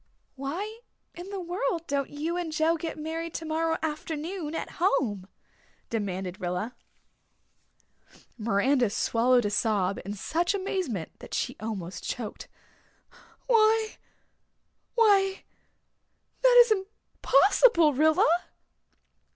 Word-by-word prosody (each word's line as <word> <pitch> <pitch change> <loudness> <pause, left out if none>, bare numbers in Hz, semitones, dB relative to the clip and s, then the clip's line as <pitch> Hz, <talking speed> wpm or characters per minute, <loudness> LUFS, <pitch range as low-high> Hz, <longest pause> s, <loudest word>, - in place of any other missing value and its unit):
"Why 360 - -5 0.3
in 355 +2 -9
the 400 -1 -4
world 350 -1 -2
don't 280 -2 -1
you 310 +4 -3
and 350 -2 -3
Joe 315 +2 +2
get 325 -1 -5
married 325 +2 -5
tomorrow 325 0 -1
afternoon 320 +2 -4
at - - -5
home?" 220 - +1 0.6
demanded 190 -3 -3
Rilla. 180 +7 -3 1.6
Miranda 235 +3 +2
swallowed 240 +3 +2
a 205 - 0
sob 205 -3 +1
in 200 +2 -5
such 340 - 0
amazement 365 - -3
that - - -7
she - - -2
almost 195 -5 -5
choked. 225 -4 -5 1.0
"Why 445 -2 +3 1.0
why 395 -4 +3 1.0
that - - +5
is 475 -2 +3
impossible, 385 - +3
Rilla." 315 +3 +4
315 Hz, 100 wpm, -27 LUFS, 225-375 Hz, 1.6 s, that